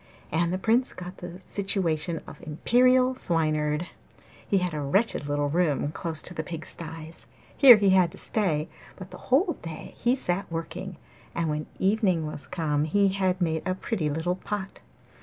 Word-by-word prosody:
And 170 +2 +1
the 185 - 0
Prince 230 +6 +2
got 180 0 -8
the 180 0 -9
situation 175 -5 -1
of - - -12
Imperial 255 +11 +3
Swineherd. 155 -6 0 0.6
He 200 - +2
had 180 -2 -1
a 150 - -2
wretched 165 +2 +1
little 145 0 +1
room 150 -3 +1
close 160 -1 -4
to 180 - -4
the 160 - -2
pigsties; 165 0 -7 0.3
here 255 -5 +10
he 200 -2 +3
had 185 -3 +4
to - - -11
stay, 165 -8 0 0.3
but 185 -1 -10
the - - -10
whole 330 +8 +3
day 165 -2 -8
he 245 +2 +2
sat 180 -8 -2
working, 165 +3 -5 0.4
and 165 -2 0
when 150 0 -3
evening 190 -5 +2
was 150 -1 -7
come 155 -4 0
he 200 +5 +3
had 190 -1 0
made 160 -3 0
a 185 - 0
pretty 190 -5 -2
little 165 +5 -1
pot. 195 -1 -5
175 Hz, 170 wpm, -27 LUFS, 160-195 Hz, 0.6 s, here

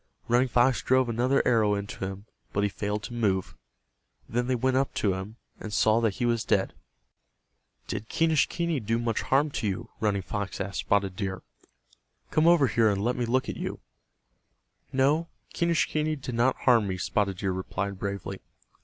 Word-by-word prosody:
Running 120 +2 +3
Fox 120 -3 +3
drove 130 +4 +2
another 125 +4 +2
arrow 110 -4 +3
into 100 -1 -5
him, 95 +1 -5 0.3
but 100 - +1
he 105 - +2
failed 105 +1 -3
to - - -7
move. 100 -6 0 0.7
Then 120 +2 -1
they 130 - +1
went 130 +2 +1
up 135 +1 +1
to 100 -3 +1
him, 95 +4 -6 0.2
and 110 - -7
saw 110 +2 +3
that 110 -4 +1
he 120 - -1
was 115 -1 +1
dead. - - +1 1.1
"Did 110 - -5
Quenischquney 165 0 +1
do 115 0 -1
much 115 -1 -1
harm 145 +3 +2
to 110 - -2
you?" 95 - -4
Running 100 -3 0
Fox 100 0 -4
asked 100 0 -3
Spotted 100 -2 +1
Deer. 95 -2 -4 0.9
"Come 155 +1 +3
over 170 -5 +6
here 115 -2 +3
and 100 -1 0
let 125 - +1
me 125 - -1
look 130 +2 +1
at - - -4
you." - - -4 1.1
"No, 145 +5 +2 0.3
Quenischquney 155 -2 +1
did 130 -3 -6
not 120 +3 +2
harm 115 -5 +4
me," 95 -1 -2
Spotted 100 0 0
Deer 95 0 -1
replied, 95 +1 -3
bravely. 100 -1 -4
115 Hz, 175 wpm, -27 LUFS, 100-130 Hz, 1.1 s, over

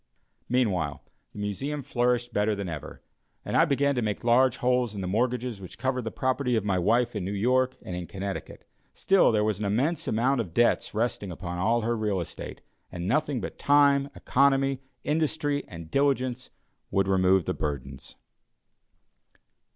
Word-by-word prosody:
Meanwhile, 95 - 0 0.3
the - - -15
Museum 135 +9 -3
flourished 120 0 0
better 105 +1 +1
than 100 -1 -4
ever; 80 -4 -7 0.4
and - - -3
I 165 - +6
began 140 -2 +2
to 125 - -1
make 105 0 -2
large 125 +2 +4
holes 125 -3 +1
in 100 - -4
the 90 - -3
mortgages 120 +1 -1
which 90 - -10
covered 125 0 -1
the - - -1
property 130 -1 0
of 110 -3 0
my 95 -3 +1
wife 115 +6 +2
in 105 - -2
New 95 - -3
York 130 +5 +2
and 90 - -5
in 90 -1 -5
Connecticut. 100 0 -6 0.3
Still, 195 -8 +4
there 105 -1 +2
was 105 -2 0
an 105 - -2
immense 130 +12 0
amount 125 +3 +2
of 85 -7 -8
debts 120 -2 +2
resting 110 -3 -1
upon 90 +1 -5
all 115 +5 +2
her 115 +1 0
real 105 -4 -1
estate, 85 - -7 0.3
and 90 0 -5
nothing 145 +2 +1
but - - -7
time, 140 -1 +4
economy, 135 0 +2 0.2
industry 150 -1 0
and 85 -2 -10
diligence 130 -3 0 0.4
would 95 0 +1
remove 95 -2 +3
the - - -1
burdens. 70 -3 -5
120 Hz, 170 wpm, -27 LUFS, 95-130 Hz, 0.4 s, I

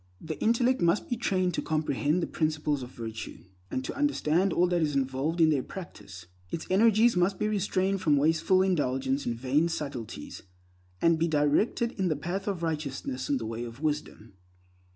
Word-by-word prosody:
The 160 -1 -6
intellect 240 +2 +2
must 170 +4 +2
be 240 - 0
trained 185 -6 0
to - - -1
comprehend 155 +1 0
the - - +1
principles 155 -2 -1
of 125 - -7
virtue, 115 -3 -7 0.3
and 130 - -3
to - - -4
understand 195 - +1
all 175 - +3
that 175 -1 +1
is 150 -2 0
involved 135 +5 -1
in 160 -1 +5
their 140 -3 +2
practice. 100 - -10 0.2
Its 160 - -4
energies 220 +3 +5
must 180 +2 +2
be 210 - 0
restrained 195 -2 0
from 150 -5 +3
wasteful 160 +5 +3
indulgence 135 -6 0
in 120 - -1
vain 135 +7 +1
subtleties, 135 - -6 0.6
and 165 -1 +4
be 165 - +2
directed 155 +10 +1
in 190 - +2
the 155 - +1
path 180 +7 -4
of 190 -4 -2
righteousness 140 -5 -3
and 140 -2 +1
the 115 - -5
way 115 +1 -4
of 115 +1 -8
wisdom. 145 -8 -3
155 Hz, 180 wpm, -28 LUFS, 135-185 Hz, 0.6 s, in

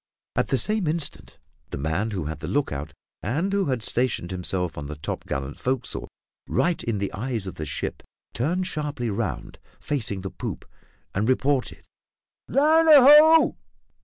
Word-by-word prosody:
At - - +1
the - - +1
same 215 -5 0
instant, 155 0 -3 0.3
the - - -5
man 80 +10 -1
who 95 -7 -3
had 75 0 -5
the - - -6
lookout, 80 - -2 0.3
and 160 - -1
who 200 -1 +2
had 130 -6 -1
stationed 120 -7 0
himself 90 -1 -1
on 75 -1 -6
the 75 - -6
topgallant 70 -1 -5
forecastle, 130 -1 -2 0.4
right 175 0 0
in 115 -3 -1
the 100 0 -3
eyes 115 -1 -3
of 95 - -5
the 75 - -6
ship, 70 - -4 0.3
turned 170 +10 0
sharply 145 -8 -3
round, 100 - -4 0.2
facing 110 -9 -2
the 95 - -6
poop, - - -6 0.5
and 105 +5 0
reported 130 0 0 0.6
"Land 315 +4 +4
ho! 300 +3 +8
120 Hz, 155 wpm, -25 LUFS, -, 0.6 s, ho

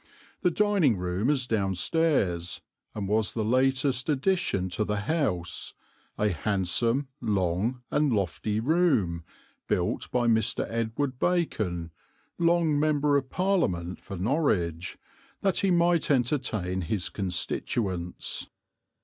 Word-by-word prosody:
The 180 - +3
dining 185 - +2
room 90 +6 -1
is 135 -4 +1
downstairs, 100 - 0 0.4
and 100 -2 -3
was 105 +1 +2
the 110 -2 -1
latest 130 +2 +1
addition 145 - +1
to 90 +5 -1
the 105 -1 -1
house, 105 - -1 0.4
a 105 - +2
handsome, 105 - 0
long 105 +3 0
and 150 -2 +2
lofty 105 +1 -1
room, 125 - +2 0.4
built - - -1
by 125 -1 +1
Mr. 110 -2 +2
Edward 115 +4 -2
Bacon, 105 - 0 0.5
long 170 -3 +3
M.P. 145 -2 +3 0.8
for 100 -1 -7
Norwich, 90 - 0 0.4
that 195 -3 +1
he 195 - +2
might 170 -1 +3
entertain 120 -9 0
his 90 +2 -2
constituents. 90 0 -2
115 Hz, 105 wpm, -27 LUFS, 95-145 Hz, 0.8 s, The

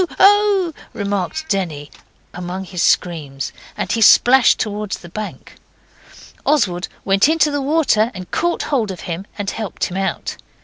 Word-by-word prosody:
oh!' 400 -3 +4 0.2
remarked 200 - -3
Denny, 160 -7 -2 0.4
among 180 +2 -5
his 180 -2 -5
screams, 145 -6 0 0.2
and 190 - -2
he 230 - 0
splashed 245 +3 +6
towards 210 -1 -3
the 175 - -13
bank. 215 +3 -8 0.9
Oswald 190 -12 +1 0.2
went 195 +7 +4
into 315 -2 +3
the 285 0 -1
water 270 -7 +2
and 185 -1 -8
caught 345 0 0
hold 240 -8 0
of 190 - -6
him 175 +3 -5
and 205 -2 -2
helped 220 -3 -5
him 180 - -1
out. 195 0 -3
205 Hz, 145 wpm, -19 LUFS, 180-285 Hz, 0.9 s, splashed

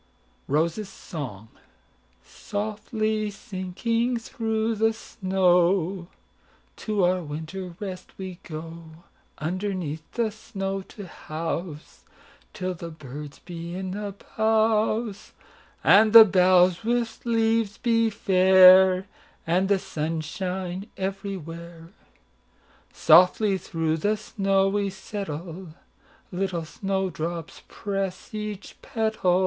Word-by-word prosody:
ROSES' 165 +8 0
SONG"SOFTLY 210 - -6
sinking 230 +4 -2
through 225 0 -2
the 225 +1 +2
snow, 185 -3 +1 0.7
To 210 -3 -1
our 180 +1 +2
winter 165 +4 -6
rest 190 -3 -7
we 185 -2 -7
go, 165 +1 -8 0.5
Underneath 180 -2 -3
the 230 -2 0
snow 195 -2 -4
to 205 +2 -11
houseTill 170 +1 -7
the 170 - -6
birds 145 -2 -9
be 170 0 -6
in 185 0 -4
the 200 0 -5 0.2
boughs, 220 -1 +1 0.5
And 215 +2 +6
the 225 -1 +12
boughs 185 -1 +4
with 235 0 -1
leaves 225 -3 +1
be 230 -2 +2
fair, 185 -1 +6 0.4
And 180 +4 +1
the 200 - +4
sun 160 -2 -3
shine 185 +3 -4
everywhere."Softly 180 +1 -1
through 160 -2 -1
the 210 +6 0
snow 195 -2 +1
we 200 0 0
settle, 185 -3 -7 0.6
Little 180 -3 -2
snow 190 +2 -2
drops 165 0 -5
press 195 -2 -4
each 210 -2 -6
petal. 220 -5 +1
190 Hz, 95 wpm, -25 LUFS, 170-210 Hz, 0.7 s, the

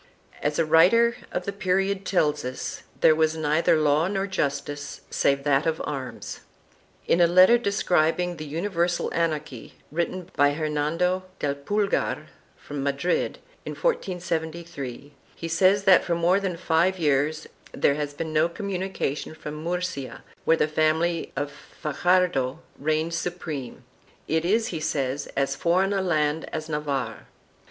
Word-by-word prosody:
As 145 0 0
a 165 - +2
writer 190 +10 +5 0.2
of 180 - -3
the 200 - -3
period 195 0 0
tells 150 -5 +1
us, 130 +1 -5 0.2
there 155 - +7
was 160 0 +1
neither 155 +1 +3
law 155 +2 +3
nor 195 0 -1
justice 145 -5 -3
save 140 0 +1
that 145 +1 +2
of 160 0 0
arms.1 135 -3 -6 0.7
In 175 - +3
a 170 - +7
letter 185 +7 +6
describing 180 -5 +1
the 155 - -6
universal 170 +2 -1
anarchy, 155 -7 -2 0.2
written 170 +2 -2
by 145 0 +4
Her 155 +1 -2
nando 165 +5 0
del 145 -5 -1
Pulgar 200 +8 -1 0.3
from 145 -1 -6
Madrid, 140 +5 0 0.3
in - - -5
1473, 170 - -3 0.2
he 165 - -5
says 185 +4 +3
that 195 -2 +6
for 170 - 0
more 175 +3 +3
than 190 -4 -3
five 175 +2 +2
years 150 -1 +1 0.3
there 140 - +2
has 145 0 -4
been 160 +1 -4
no 155 +2 +3
communication 190 -6 -3
from 150 0 -7
Murcia, 180 -5 -3 0.2
where 165 - +4
the 150 - +2
family 160 +2 +1
of 145 0 -2
Fajardo 155 -4 0 0.2
reigned 155 +3 0
supreme 165 -7 -4 0.2
— - - -31
it 160 +1 0
is, 220 +5 +2
he 165 - -3
says, 140 -2 -2
as 140 0 +1
foreign 185 +4 +2
a 195 - +1
land 155 -3 0
as 155 0 -4
Navarre. 140 -7 -3
160 Hz, 145 wpm, -25 LUFS, 145-180 Hz, 0.7 s, there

